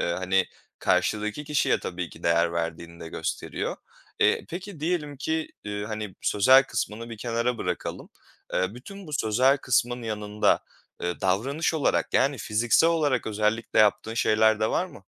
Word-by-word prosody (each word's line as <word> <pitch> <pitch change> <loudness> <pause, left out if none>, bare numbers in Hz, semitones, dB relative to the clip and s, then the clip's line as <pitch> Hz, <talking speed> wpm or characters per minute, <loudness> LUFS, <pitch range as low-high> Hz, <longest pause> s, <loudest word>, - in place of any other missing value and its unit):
Iıı, 85 - 0
hani, 95 0 +1 0.3
karşıdaki 110 +6 0
kişiye 150 -1 +2
tabii 90 -2 -4
ki 80 - -14
değer 85 0 +2
verdiğini 85 0 -4
de 80 - -7
gösteriyor. - - -3 0.4
Iıı, - - +4
peki, 180 -1 -7
diyelim 155 -3 -1
ki, 160 +3 -2 0.2
ııı, 105 0 -3
hani, 105 -3 -5
sözel 130 +6 +5
kısmını 115 -2 -4
bir 115 - -6
kenara 115 +1 -1
bırakalım. 90 -1 -4 0.5
Iıı, 95 +4 0
bütün 195 +9 -10
bu 150 - -10
sözel 130 +2 +3
kısmın 120 -1 0
yanında, 105 -1 +1 0.4
ııı, 90 0 -2
davranış 135 - 0
olarak, 155 - 0
yani, 140 0 +3
fiziksel 115 +10 +3
olarak 150 -8 +1
özellikle 110 +1 0
yaptığın 110 +1 +3
şeyler 110 -1 +3
de 110 - +1
var 185 - +1
mı? 125 - -14
110 Hz, 155 wpm, -26 LUFS, 100-140 Hz, 0.5 s, sözel